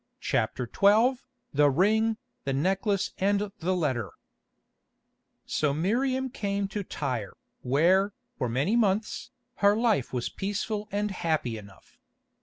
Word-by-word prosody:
CHAPTER 125 - -1
XII 220 - +4 0.4
THE 145 0 +5
RING, 220 +8 +2 0.3
THE 135 - -1
NECKLACE 195 +7 0
AND 200 +1 +1
THE 185 +2 0
LETTER 130 - -1 1.4
So 145 -2 0
Miriam 260 - 0
came 200 -2 -2
to 205 +1 -3
Tyre, 125 - -4 0.3
where, 180 +10 +3 0.2
for 125 - -2
many 140 - +1
months, 215 -2 0 0.3
her 205 +1 +4
life 220 - +1
was 125 -2 -2
peaceful 205 +2 -3
and 205 +1 -1
happy 160 -10 -1
enough. 100 - -13
195 Hz, 120 wpm, -28 LUFS, 140-210 Hz, 1.4 s, THE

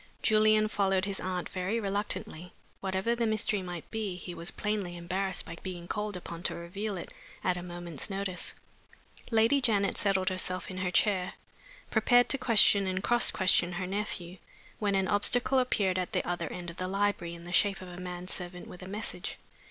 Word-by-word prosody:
Julian 215 0 +5
followed 195 -2 +1
his 200 -1 -3
aunt 185 -1 -2
very 190 +5 -1
reluctantly. 195 -4 -3 0.3
Whatever 190 +4 0
the 235 -1 0
mystery 215 -2 0
might 175 -3 -7
be, 215 -4 -2
he 180 0 -7
was 170 +1 -3
plainly 205 -4 -2
embarrassed 185 +2 -1
by 170 - -7
being 175 -2 -6
called 210 -1 -2
upon 170 -1 -7
to - - 0
reveal 195 +4 -4
it 170 - -8 0.3
at 180 - +2
a 180 - -4
moment's 175 -2 -6
notice. 195 -2 -2 0.7
Lady 230 +4 +4
Janet 205 -5 +2
settled 190 -2 +2
herself 185 0 -1
in 185 - -6
her 185 -1 0
chair, 185 0 +2 0.6
prepared 245 +2 +5
to 275 - +2
question 210 -5 +5
and 185 +1 -1
cross 240 +2 +4
question 185 -1 +3
her 180 +1 -2
nephew, 190 -2 -4 0.4
when 205 -2 +1
an 190 -1 +2
obstacle 245 +6 +3
appeared 195 -7 +1
at 180 - -3
the - - 0
other 175 -3 -2
end 175 -1 -5
of 170 - -15
the 185 - -2
library, 195 -3 0
in 170 - -11
the 175 - -8
shape 200 0 +4
of 185 - -9
a 180 0 -9
man 180 0 -6
servant 180 -1 -5
with 180 - -11
a 185 - -8
message. 210 +3 -1
190 Hz, 190 wpm, -30 LUFS, 180-210 Hz, 0.7 s, Julian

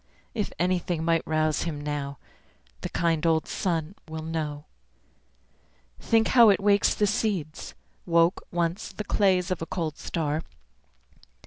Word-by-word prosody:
If 215 -4 -2
anything 175 -2 0
might 165 -1 +3
rouse 155 -1 +1
him 160 -4 -3
now 145 -1 -4 0.6
The - - -4
kind 165 -2 0
old 160 -1 +2
sun 170 -3 -2
will 160 0 -6
know. 155 -2 -4 1.3
Think 225 -1 +2
how 235 -3 +7
it 195 - +4
wakes 205 0 +3
the 210 - +2
seeds 195 -7 -2 0.3
Woke, 170 +1 +3
once, 170 +1 -1
the 210 - -5
clays 190 -3 +2
of 180 - -2
a 165 - -4
cold 160 -4 -3
star. 155 -2 -2
165 Hz, 135 wpm, -26 LUFS, 155-185 Hz, 1.3 s, how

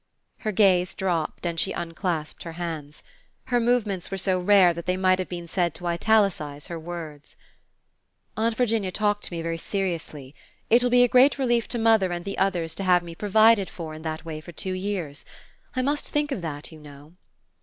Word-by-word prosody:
Her 215 - -2
gaze 185 -3 +3
dropped 175 -3 -2
and 170 -1 -2
she 190 - 0
unclasped 165 -2 -3
her 165 - -7
hands. 160 -4 -6 0.5
Her 245 - +5
movements 230 -6 0
were 195 - -3
so 185 0 +1
rare 185 -1 +5
that 170 +1 -8
they 180 0 +1
might 185 0 +3
have 185 - -3
been 175 -1 -6
said 170 -1 -1
to 175 - -8
italicize 170 -5 +1
her 170 -1 -6
words. 160 -3 -8 1.0
"Aunt 225 +1 0
Virginia 225 -5 0
talked 205 +1 0
to - - -6
me 165 -1 -4
very 165 0 -3
seriously. 165 -8 -4 0.4
It 235 +2 +6
will 245 - +3
be 245 0 +6
a - - +5
great 255 +4 +5
relief 240 -4 +1
to 240 - -2
mother 225 -5 +3
and 175 0 -4
the 200 - -4
others 175 -4 0
to 195 - -3
have 180 -2 +4
me 170 -1 -8
provided 215 +2 +4
for 160 -3 -7
in 155 - -9
that 160 0 -5
way 155 -1 -6
for 175 - -11
two 185 +3 -4
years. 185 -6 -4 0.5
I 255 - 0
must 290 +2 -1
think 295 0 -1
of 230 - -2
that, 155 -2 -6
you 160 - -12
know." 145 +1 -14
180 Hz, 200 wpm, -25 LUFS, 165-210 Hz, 1.0 s, It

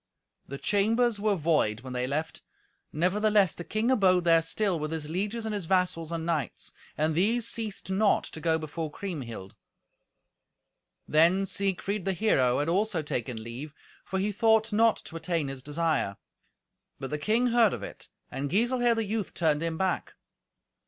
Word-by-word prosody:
The 140 - -6
chambers 220 - +1
were 210 0 +2
void 150 - +1
when 130 0 -8
they 125 0 -1
left, 155 +4 -3 0.5
nevertheless 200 +3 +2
the 175 - -7
king 220 +7 0
abode 185 -7 +4
there 165 -1 +5
still 185 +1 0
with 155 +1 -3
his 160 -2 -4
lieges 205 +7 -3
and 220 - -2
his 200 -5 -4
vassals 180 -3 0
and 165 -1 -3
knights. 155 -7 -3 0.2
And 155 +1 +1
these 220 +8 +2
ceased 215 -5 -3
not 200 +2 +3
to 160 - -8
go 160 0 +2
before 160 0 -5
Kriemhild. 130 - -6 1.5
Then 170 +5 +4
Siegfried, 195 0 -1
the 195 - +1
hero, 135 - +2
had 145 - 0
also 185 -1 +1
taken 120 -5 -3
leave, 130 +7 -8 0.3
for 190 - -3
he 200 +2 0
thought 220 0 +2
not 225 +1 +4
to 165 - -9
attain 160 -3 -1
his 135 -1 -7
desire. 150 -8 -1 0.8
But 135 - -6
the 150 - -2
king 230 +8 +2
heard 230 -4 +5
of - - -5
it, - - -9 0.2
and 135 +2 -3
Giselher 240 - +2
the 225 -1 -1
youth 210 0 -3
turned 155 -3 +1
him 165 -1 -2
back. 190 +1 -1
175 Hz, 165 wpm, -28 LUFS, 155-210 Hz, 1.5 s, there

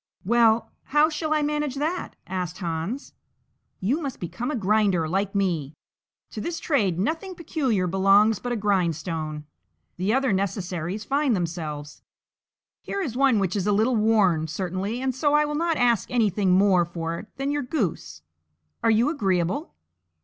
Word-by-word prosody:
"Well! 230 +1 +3
how 300 +3 +3
shall 310 0 -3
I 305 -1 +2
manage 295 -2 -1
that?" 315 +6 -2
asked 180 -2 -4
Hans. 170 - -4 0.7
"You 255 - 0
must 275 -5 -5
become 230 - -4
a 300 - -1
grinder 205 -6 +2
like 195 +4 -1
me; 165 -7 -1 0.6
to 215 - -5
this 335 +7 -3
trade 205 - +1
nothing 325 - -2
peculiar 265 - -1
belongs 195 +3 +4
but 245 - -4
a - - 0
grindstone; 165 -6 -1 0.5
the 185 +4 0
other 265 -2 +2
necessaries 190 0 -2
find 275 -2 +1
themselves. 155 -5 -4 0.8
Here 400 - -3
is 245 -9 -4
one 265 -3 +4
which 195 -2 0
is 200 -1 -1
a - - +3
little 225 +5 +2
worn, 205 -8 +3
certainly, 190 - -3
and 265 -1 0
so 290 +3 +2
I 300 0 +4
will 295 - -3
not 330 +1 0
ask 240 -3 +2
anything 210 -5 +1
more 185 -2 +4
for 170 -1 -4
it 215 - -10
than 275 +1 -2
your 290 0 0
goose; 230 - -3 0.6
are - - +2
you 225 +3 +4
agreeable?" 190 - -1
210 Hz, 160 wpm, -25 LUFS, 180-270 Hz, 0.8 s, belongs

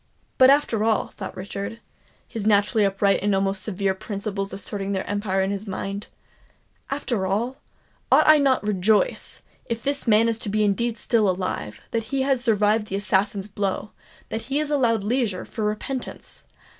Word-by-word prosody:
"But, 260 0 +8
after 275 -6 +3
all," 220 -1 +1
thought 190 - -8
Richard, 200 +4 -5 0.5
his 220 -3 -4
naturally 205 +1 +3
upright 195 0 +2
and 205 0 +2
almost 195 0 0
severe 195 -1 0
principles 200 0 -4
asserting 200 0 -3
their 190 - -2
empire 205 -2 0
in 190 - -1
his 200 +1 -4
mind,—"after 200 +3 -6
all, 230 +7 -1 0.5
ought - - +6
I 310 -1 +8
not 270 -2 +3
to 210 - -6
rejoice, 205 +2 +1 0.2
if 230 -1 -4
this 280 -1 -2
man 220 +1 +5 0.2
be 215 +1 +1
indeed 230 +3 0
still 215 -2 +2
alive, 185 - -3
that 225 -1 -1
he 265 +4 -1
has 265 -2 +1
survived 215 -1 +2
the 195 - -3
assassin's 200 0 0
blow—that 205 +2 -5
he 275 +4 -2
is 300 -1 -2
allowed 235 -7 +2
leisure 220 -4 -1
for 220 -3 -4
repentance! 240 +5 -5
210 Hz, 155 wpm, -24 LUFS, 195-230 Hz, 0.5 s, But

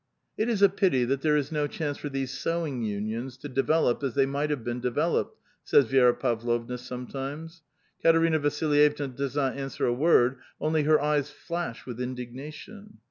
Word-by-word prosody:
^^ - - -51 0.3
It 220 +2 0
is 210 -4 +1
a 200 - +8
pity 185 -10 +2
that 135 +2 -1
there 150 0 +3
is 145 +1 -2
no 150 -2 0
chance 145 -1 -3
for 145 - -6
these 135 -1 -3
sewing 165 -6 -2
unions 110 +4 -3
to 140 - -8
develop 135 0 +1
as 135 -4 -2
they 135 -1 +4
might 140 +2 -1
have 145 -6 -2
been 120 +1 -3
developed," 125 -1 0 0.3
says 140 - +5
Vi^ra 125 0 +4
Pavlovna 120 0 -1
sometimes. 135 +6 -7 0.4
Katerina 165 -1 +4
Vasilj 145 0 +3
evna 140 -4 -5
does 140 0 -3
not 135 -3 0
answer 135 -1 -3
a 120 - +2
word, 130 -2 +3 0.2
only 155 0 +1
her 155 0 +5
eyes 150 -1 +1
flash 170 -3 -5
with 125 -1 -6
indignation. 135 - -8
140 Hz, 185 wpm, -27 LUFS, 125-155 Hz, 0.4 s, a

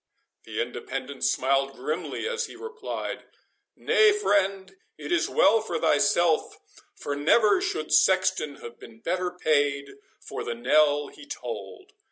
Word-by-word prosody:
The - - -5
Independent 130 +1 -5
smiled 135 +1 +1
grimly 155 - -4
as 475 0 -2
he - - -12
replied, 455 0 -6 0.5
"Nay, 430 -1 +4
friend, 195 - 0 0.2
it - - -7
is 345 - +1
well 225 +2 +4
for 175 -7 -3
thyself, 160 +3 +2 0.4
for 145 - -4
never 210 - +3
should 405 +3 -2
sexton 185 -6 +3
have 120 0 -10
been 115 -1 -14
better 185 +5 -1
paid 145 -5 0 0.2
for - - -7
the 120 - -4
knell 145 +4 +2
he 285 - -14
tolled. 380 +6 -7
175 Hz, 135 wpm, -26 LUFS, 140-225 Hz, 0.5 s, Nay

